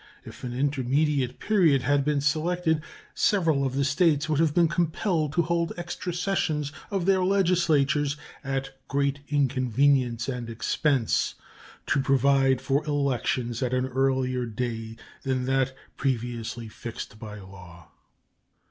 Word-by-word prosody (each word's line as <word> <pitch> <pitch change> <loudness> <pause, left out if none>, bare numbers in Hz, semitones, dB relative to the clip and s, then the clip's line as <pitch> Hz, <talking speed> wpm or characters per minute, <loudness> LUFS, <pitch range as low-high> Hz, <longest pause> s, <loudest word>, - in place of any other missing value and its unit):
If - - -11
an 125 - -4
intermediate 135 0 0
period 170 - +3
had 145 +1 +2
been 145 0 +1
selected, 160 +2 +1 0.3
several 165 -9 +2
of 135 -1 -1
the 140 0 +1
States 150 0 +2
would 155 -2 +1
have 160 -2 +2
been 170 -1 +5
compelled 165 -1 0
to 170 - +2
hold 170 0 0
extra 175 +1 -4
sessions 170 -5 -1 0.2
of 195 -4 -1
their 190 -1 +3
legislatures, 160 -7 +2 0.3
at 135 0 -3 0.2
great 140 0 0
inconvenience 130 -3 +2
and 125 -3 -4
expense, 120 +2 0 0.5
to 140 - +1
provide 135 -1 +3
for 135 +3 +1
elections 130 -4 -1
at 130 0 0
an 125 0 +1
earlier 130 -1 0
day 115 -1 -4 0.3
than 130 -2 -1
that 135 0 +1 0.2
previously 120 -3 -2
fixed 110 -1 -8
by 105 -1 -8
law. 90 -4 -13
140 Hz, 130 wpm, -26 LUFS, 125-155 Hz, 0.5 s, been